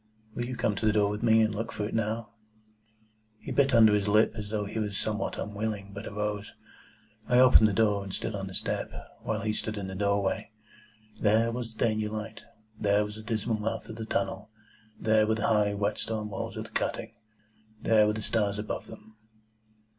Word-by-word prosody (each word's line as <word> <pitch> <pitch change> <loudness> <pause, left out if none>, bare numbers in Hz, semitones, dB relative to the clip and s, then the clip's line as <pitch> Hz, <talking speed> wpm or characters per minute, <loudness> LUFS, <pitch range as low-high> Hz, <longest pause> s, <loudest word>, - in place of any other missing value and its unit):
"Will 120 - -3
you 125 +1 -4
come 105 - +1
to 110 - 0
the - - +5
door 105 -1 +2
with 105 - -4
me, 110 -1 +5
and 110 -1 +1
look 115 +2 -3
for 105 - -3
it - - -7
now?" 115 +1 -2 1.1
He - - -8
bit 140 -1 +3
his 120 - +4
under 110 -2 +7
lip 105 +1 +3
as 105 -2 -6
though 105 -1 -1
he 110 +2 -4
were 105 -1 -1
somewhat 105 +2 -2
unwilling, 105 -1 -4
but 100 +2 -7
arose. 105 0 -3 0.7
I 125 - +3
opened 125 -4 +8
the 105 - 0
door, 105 -1 +2
and 100 - -7
stood 110 - -3
on 95 -1 -4
the 95 - -7
step, - - -2 0.3
while 110 0 -2
he 110 0 -1
stood 110 0 -3
in 100 - -4
the 95 - -6
doorway. 100 0 0 0.7
There 110 +2 +3
was 115 -2 -5
the - - +1
Danger 110 -1 0
light. 110 +1 -6 0.4
There 105 0 +3
was 105 +1 -8
the - - -8
dismal 110 0 -1
mouth 110 0 -3
of 110 - -7
the 110 - -4
tunnel. 100 0 -2 0.5
There 110 -1 +3
were 110 - +2
the 110 - -1
high, 105 -2 +3
wet 105 +1 -1
stone 110 -1 -3
walls - - -5
of - - -3
the - - -12
cutting. - - -2 0.7
There 110 -2 +5
were 105 - +2
the 110 0 -4
stars 105 -3 0
above 105 0 -4
them. 110 +1 -13
105 Hz, 210 wpm, -29 LUFS, 105-110 Hz, 1.1 s, opened